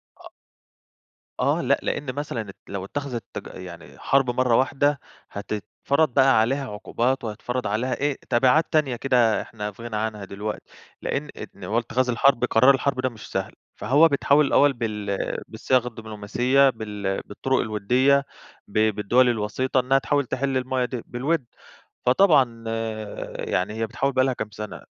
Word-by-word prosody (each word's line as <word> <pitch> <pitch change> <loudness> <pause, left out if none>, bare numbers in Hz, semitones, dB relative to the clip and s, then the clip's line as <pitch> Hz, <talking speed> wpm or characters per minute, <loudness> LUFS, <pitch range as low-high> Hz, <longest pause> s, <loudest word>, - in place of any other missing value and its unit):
أ - - -13 1.1
آه - - +2
لأ، - - +2
لأن 135 -3 -2
مثلًا 115 -9 -4
لو 95 -1 -5
اتّخذِت 135 -1 -4
تج - - -6
يعني 85 -3 -10
حرب 135 -2 +2
مرة 125 -2 +3
واحدة، 140 +2 +2 0.3
هتتفرض 110 - -1
بقى 135 -4 +5
عليها 130 +1 -1
عقوبات، 120 +5 -1
وهيتفرض 115 +2 -3
عليها 115 +5 -1
إيه 145 -1 -1
تبعات 130 +6 +4
تانية 150 -6 +2
كده 120 -5 +2
إحنا 105 -1 -6
في 115 +4 -13
غنى 115 -2 -5
عنها 105 -1 -3
دي 100 - -10
دلوقتي، 105 +1 -4 0.4
لأن 145 +1 -3 0.3
إن 100 - -13
هو 110 +6 0
اتخاذ 125 +2 -1
الحرب 125 +1 +3
قرار 130 +4 +5
الحرب 135 -1 -1
ده 130 - 0
مش 110 -3 -12
سهل، - - -3 0.2
فهو 150 +5 +4
بيتحوّل 145 0 +3
الأول 145 +1 +4
بال 105 -4 -3 0.3
بالصياغة 125 -2 0
الدبلوماسية، 115 +5 +1
بال 105 -4 -4
بالطرق 130 +6 -1
الودية، 125 +6 +2 0.4
ب 100 - -5 0.2
بالدول 120 +5 +3
الوسيطة، 120 +4 0
إنها 130 +2 +3
تحاول 145 0 0
تحل 135 +2 -1
المَيَّة 130 0 0
دي 125 -2 -5
بالود، 135 +3 -1 0.6
فطبعًا 130 -6 +4 0.7
يعني 95 +6 -1
هي 110 0 -2
بتحاول 135 +5 -1
بقى 130 0 +3
لها 130 - +1
كام 110 -2 -5
سنة، 105 0 -7
125 Hz, 155 wpm, -24 LUFS, 110-135 Hz, 1.1 s, بقى